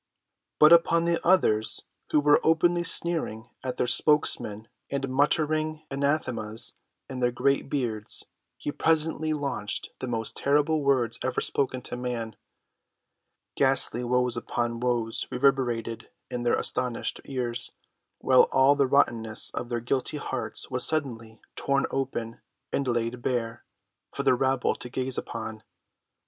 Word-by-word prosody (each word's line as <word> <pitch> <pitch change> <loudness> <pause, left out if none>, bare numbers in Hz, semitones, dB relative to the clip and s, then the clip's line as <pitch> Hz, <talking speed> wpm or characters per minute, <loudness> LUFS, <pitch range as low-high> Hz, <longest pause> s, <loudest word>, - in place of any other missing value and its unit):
But 150 +2 +7
upon 170 0 +4
the 170 0 0
others, 110 -12 +3 0.2
who 150 - +2
were 145 0 +4
openly 170 +2 +2
sneering 160 -10 +2
at 130 -1 -4
their - - +1
spokesman 120 -6 +2 0.2
and 140 -1 -3
muttering 155 +3 0
anathemas 130 -6 0 0.3
in 130 -2 -7
their 125 -1 +1
great 140 +3 0
beards, 115 -7 -2 0.3
he 145 - -4
presently 160 0 +1
launched 140 -8 -3
the 130 - -5
most 115 -2 -2
terrible 150 +2 +1
words 125 -5 +1
ever 130 -1 -1
spoken 130 -2 -1
to - - -5
man. 120 -3 -5 1.2
Ghastly 135 -3 +3
woes 125 0 0
upon 120 0 -3
woes 120 -2 -1
reverberated 125 -4 -1 0.2
in 125 -1 -3
their 120 0 +1
astonished 125 -2 0
ears, 120 -3 +1 0.5
while 130 -1 +4
all 135 +2 +4
the 140 -2 +2
rottenness 115 -5 +1
of 120 - -6
their 120 -1 -2
guilty 130 +5 -1
hearts 145 - -2
was 125 -1 +1
suddenly 115 -8 +1 0.2
torn 140 0 0
open 125 -4 -4 0.3
and 140 - -1
laid 120 0 -2
bare 115 -2 -3 0.5
for - - -4
the - - +4
rabble 130 0 0
to 125 - -7
gaze 130 +1 -2
upon. 110 -1 -7
130 Hz, 135 wpm, -26 LUFS, 120-145 Hz, 1.2 s, But